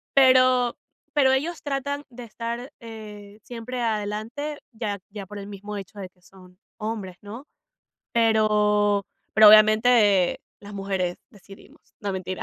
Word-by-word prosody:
pero 255 -2 +5 0.4
pero 270 -3 +4
ellos 315 +6 -1
tratan 285 0 -3
de 245 0 -10
estar, 235 +4 -6
eh, 210 -2 -11
siempre 245 +1 -6
adelante, 225 +7 -3
ya 210 -3 -4
ya 205 -1 -8
por 205 +2 -10
el 200 - -8
mismo 205 +1 -7
hecho 200 +1 -9
de 185 -2 -7
son 180 0 -18 0.2
hombres, 210 -5 -5
¿no? 225 +7 -9 0.7
Pero 210 -3 +2 0.3
pero, 215 0 +9
obviamente, 215 -3 +5 0.2
las 205 0 -11
mujeres 190 -3 -2
decidimos, 195 0 -17 0.2
no, 200 -1 -3
mentira. 185 0 -5
215 Hz, 130 wpm, -24 LUFS, 200-245 Hz, 0.7 s, pero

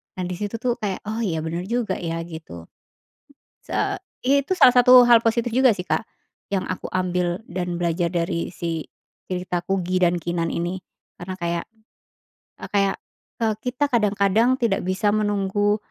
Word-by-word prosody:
Nah, 185 - -3
disitu 205 +4 -4
tuh 245 -2 +1
kayak, 200 -4 -3
"oh 220 - -3
iya, 165 -6 -1
benar 170 +3 -4
juga 230 -3 -1
ya" 165 -1 -3
gitu. 155 - -10 1.0
Sa - - -1 0.2
iya, 280 +2 +2
salah 255 -8 +6
satu 250 0 +9
hal 235 -1 +8
positif 235 +1 +1
juga 255 0 +4
sih, 180 - -4
Kak, - - 0 0.5
yang 190 - +1
aku 185 - -4
ambil 180 0 0
dan 180 -1 -3
belajar 170 0 +1
dari 170 0 -2
si 165 -2 -3 0.4
cerita 180 -1 -2
Kugy 185 -1 0
dan 175 0 +1
Keenan 170 -1 -2
ini, 175 +2 -2 0.4
karena 185 +1 -6
kayak 170 0 -1 1.0
eee, - - -6
kayak, 195 -1 +2 0.5
eee, 220 -1 +2
kita 250 +3 -1
kadang-kadang 210 +2 +3
tidak 230 -6 0
bisa 205 +2 +1
menunggu, 205 0 +1
190 Hz, 155 wpm, -23 LUFS, 175-220 Hz, 1.0 s, satu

